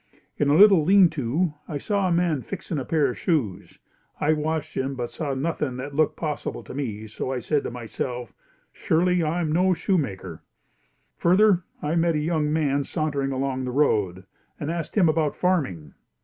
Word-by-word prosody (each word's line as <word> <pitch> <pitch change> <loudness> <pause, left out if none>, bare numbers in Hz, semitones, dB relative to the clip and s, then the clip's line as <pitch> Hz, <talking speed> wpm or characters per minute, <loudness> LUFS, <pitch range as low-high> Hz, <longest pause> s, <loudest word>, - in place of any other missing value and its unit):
In 145 - +1
a 145 - +4
little 195 -2 +7
leanto 160 -4 +3
I 150 - -3
saw 200 +5 0
a - - 0
man 170 -5 +1
fixing 170 0 -5
a 130 - -4
pair 155 -3 +2
of 125 - -6
shoes. 125 - -1 0.4
I 155 +2 +3
watched 155 0 -2
him, 135 +1 -2
but 120 -2 -4
saw 145 -4 -3
nothing 140 -2 -2
that 140 +3 -6
looked 155 +1 +2
possible 150 -3 -4
to - - -10
me 110 -6 -4
so 125 +4 -4
said 145 +3 0
to - - -2
myself, 120 0 -5 0.4
"Surely 180 +2 +1
I 165 +2 0
am 155 -3 -1
no 180 +3 +3
shoemaker." 130 - -2 0.8
Further 185 +1 +4 0.2
I 150 +1 0
met 165 -1 +2
a - - +1
young 150 -1 0
man 145 -3 +1
sauntering 145 -2 -2
along 130 0 -2
the - - -3
road 105 -10 +1 0.3
and 150 +2 -3
asked 165 +2 -4
him 185 -5 +5
about 155 -2 +1
farming. 135 - -1
150 Hz, 175 wpm, -24 LUFS, 130-170 Hz, 0.8 s, little